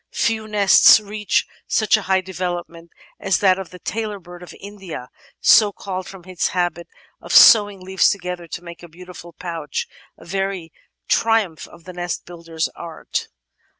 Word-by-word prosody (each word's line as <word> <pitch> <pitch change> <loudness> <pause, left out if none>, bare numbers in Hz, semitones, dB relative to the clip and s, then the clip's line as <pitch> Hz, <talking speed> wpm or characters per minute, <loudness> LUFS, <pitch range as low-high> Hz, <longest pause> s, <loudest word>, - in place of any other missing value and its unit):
Few 220 -1 -1
nests 205 +1 +6
reach 210 0 -1 0.2
such 215 -1 +3
a 215 - -1
high 190 -1 +1
development 175 -2 -6 0.3
as 195 -2 +1
that 190 -2 +3
of 190 - -7
the 180 - -12
Tailor 215 +3 -4
bird 175 -1 -13
of 180 - -11
India, 190 -10 -9 0.3
so 210 -2 +6
called 190 -2 -6
from 190 -3 -12
its 185 -2 -1
habit 175 -1 -1 0.3
of - - -9
"sewing" 205 -3 +7
leaves 190 0 +2
together 180 -3 -4
to 170 - -7
make 170 -1 -11
a 175 - -11
beautiful 175 +1 -12
pouch, 165 -4 -5 0.3
a - - -16
very 195 -2 -4 0.3
triumph 225 -8 +1
of 170 - -17
the 185 - -10
nest 175 -1 -4
builder's 165 -2 -4
art. 165 -2 -6
185 Hz, 160 wpm, -20 LUFS, 170-200 Hz, 0.3 s, sewing